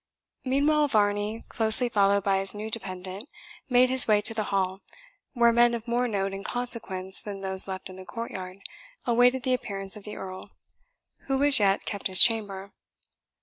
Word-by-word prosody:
Meanwhile, 290 +3 +1
Varney, 210 -1 -1
closely 220 +2 +1
followed 200 -3 +1
by 195 -1 +1
his 195 +1 0
new 215 +1 -7
dependant, 190 +2 -6 0.4
made 250 0 +3
his 260 -1 +2
way 210 -2 +3
to 215 - +3
the 215 -2 -3
hall, 190 -1 -2 0.5
where 235 -2 +3
men 240 0 +3
of 230 +1 -8
more 240 +1 0
note 195 -3 -3
and 195 0 -7
consequence 205 -7 -3
than 200 -2 -8
those 190 0 0
left 190 -1 -7
in 185 - -12
the 190 - -10
courtyard 195 -5 -8 0.4
awaited 245 +1 +2
the 255 - 0
appearance 195 -5 -5
of 210 - -12
the 210 +1 -8
Earl, 185 -1 -9 0.8
who 270 0 0
as 285 -3 +6
yet 195 -1 +1
kept 200 - -4
his 185 -1 +10
chamber. 200 -4 +1
210 Hz, 175 wpm, -26 LUFS, 195-240 Hz, 0.8 s, his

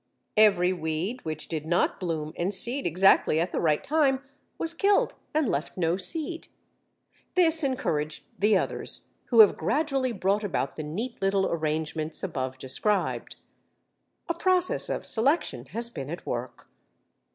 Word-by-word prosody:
Every 195 -4 +4
weed 175 +8 -3
which 155 -1 -5
did 155 -1 -4
not 175 +1 +1
bloom 160 -4 -3
and 175 +3 -1
seed 240 +8 +4
exactly 175 -2 +4
at 170 +3 -1
the - - -2
right 155 -3 +1
time 280 -3 +1 0.3
was 330 0 0
killed 395 +4 +2 0.2
and 305 -3 +1
left 150 -2 -3
no 170 -1 +1
seed. 325 - +1 0.9
This 330 -3 +4
encouraged 155 - -2 0.2
the 210 0 +4
others, - - -4 0.2
who 230 -3 +6
have 210 - +6
gradually 270 - 0
brought 200 0 0
about 150 -9 -2
the - - -5
neat 210 +12 -5
little 195 0 +1
arrangements 155 0 -1
above 130 -8 -3
described. 190 +11 -1 0.9
A 340 - 0
process 365 +1 +1
of - - -3
selection 235 - +1
has 235 +5 -4
been 135 - -7
at 170 +3 -7
work. 125 +1 -5
190 Hz, 145 wpm, -26 LUFS, 155-260 Hz, 0.9 s, who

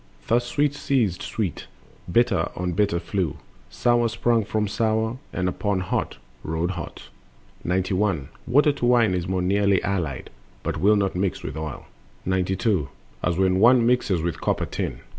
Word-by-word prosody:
Thus 120 +1 +2
Sweet 145 +3 +1
seized 120 - 0
Sweet, 100 -8 -3 0.4
Bitter 115 -6 +2
on 90 0 -2
Bitter 100 -2 +1
flew, 90 -4 -2 0.3
Sour 120 -1 +2
sprung 115 0 +1
for 110 +1 -1
Sour, 110 +3 0
and 90 0 -1
upon 100 +1 -1
Hot 90 - -2 0.3
rode 80 +3 -1
hot. 85 -5 -8 0.5
91. 95 -4 0 0.2
Water 145 +5 +5
to 140 -4 -3
wine 110 -8 +3
more 95 -1 0
nearly 100 +1 +3
is - - -2
allied, 85 -9 -2 0.3
But - - -2
will 100 +7 +4
not 100 -2 0
mix 95 0 -1
with - - -5
oil. 80 -4 -5 0.4
92. 95 - 0 0.3
As 85 -2 +1
when 95 0 +3
one 120 +2 +6
mixes 110 -8 +2
with 85 -1 0
the - - -13
copper - - 0
tin. - - -4
100 Hz, 160 wpm, -24 LUFS, 90-115 Hz, 0.5 s, one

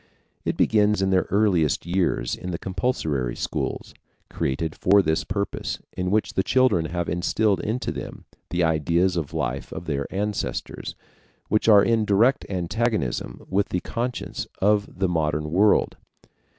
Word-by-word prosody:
It - - -1
begins 105 -2 +3
in 95 - +1
their 95 -1 +2
earliest 95 -8 +2
years 85 -10 0
in 90 - -7
the 85 - -2
compulsory 85 - -1
schools, - - -3 0.4
created 75 +4 -2
for 100 +1 +4
this 80 -2 +1
purpose, 100 -1 -3 0.2
in 90 0 -1
which 105 +2 +1
the - - +2
children 130 -7 +3
have 85 +1 -3
instilled 95 +4 +1
into 115 +3 -2
them - - -7 0.2
the 90 0 0
ideas 85 +3 +2
of 80 -5 -2
life - - -3
of 85 - -6
their 70 -3 -2
ancestors, 105 +1 -3 0.5
which 110 +2 +2
are 100 -2 +8
in 115 -2 +2
direct 115 +7 +3
antagonism 95 - -2
with 100 +1 0
the 90 - -1
conscience 120 +1 -4
of 105 +1 +2
the 95 0 +1
modern 75 -3 -1
world. 100 +5 +3
95 Hz, 150 wpm, -24 LUFS, 85-105 Hz, 0.5 s, are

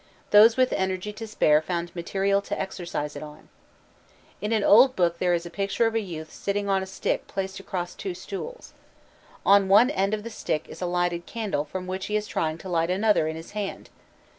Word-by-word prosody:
Those 220 +3 +7
with 255 0 +3
energy 190 +2 -2
to 225 +1 -7
spare 155 -8 +3
found 170 +1 -4
material 195 +3 0
to - - -4
exercise 170 -6 -4
it - - -6
on. 150 -1 -11 0.9
In 210 +2 -2
an 220 -2 +2
old 250 +7 +6
book 170 -2 +1
there 180 -1 +2
is 170 0 -3
a 170 - -8
picture 200 +5 0
of 225 - +1
a 225 - +2
youth 160 -6 -7
sitting 200 0 -2
on 195 -1 +2
a 190 - -5
stick 190 - -2
placed 190 0 -4
across 180 -2 -4
two 190 -3 -5
stools. 205 - -7 0.7
On 200 0 +6
one 220 +7 +6
end 200 -5 +1
of 210 - -8
the 230 - -7
stick 160 -7 -2
is - - -11
a 180 - -1
lighted 175 -1 -1
candle 210 -10 -2
from 185 +4 -6
which 185 +1 -4
he 210 - -2
is 210 0 0
trying 160 -5 -2
to 190 - -10
light 165 -2 0
another 195 -3 +2
in 160 - -3
his 165 +1 -9
hand. 205 -2 -5
190 Hz, 215 wpm, -26 LUFS, 175-210 Hz, 0.9 s, Those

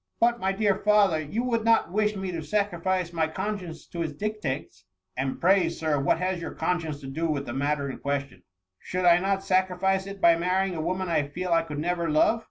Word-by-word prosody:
'' - - -58
" - - -46
But, 235 +1 +3
my 190 -2 0
dear 200 0 +2
father! 205 -6 +3
you 180 +11 -3
would 235 -3 0
not 225 -6 +3
wish 210 +1 +1
ni3 190 -1 -3
to 165 -2 -4
sacrifice 185 0 -1
my 160 -2 +1
conscience 175 -3 -5
to 170 - -5
its 160 -3 -2
dictates." 145 - -4 0.2
" 95 0 -55
And 135 +1 -2
pray. 185 -1 +4
Sir, 155 -3 -1
what 140 - +2
has 185 0 -2
your - - -6
conscience 165 -5 -2
to 135 - -8
do 160 +5 -2
with 145 -3 -2
the 120 - -5
matter 140 +1 -1
in 135 - -6
question 140 -8 -3 0.2
?" 95 0 -58
" 95 - -59
Should 185 0 -3
I 175 0 +7
not 195 +1 0
sacrifice 190 0 +1
it 200 0 -8
by 170 -3 +6
marrying 185 +2 0
a 160 - -3
wo 175 +3 -1
man 185 0 -3
I 155 -4 +1
feel 180 +5 -4
I 165 - +4
could 150 -3 -7
never 170 +2 -1
love 155 +9 +3
175 Hz, 245 wpm, -26 LUFS, 150-195 Hz, 0.2 s, I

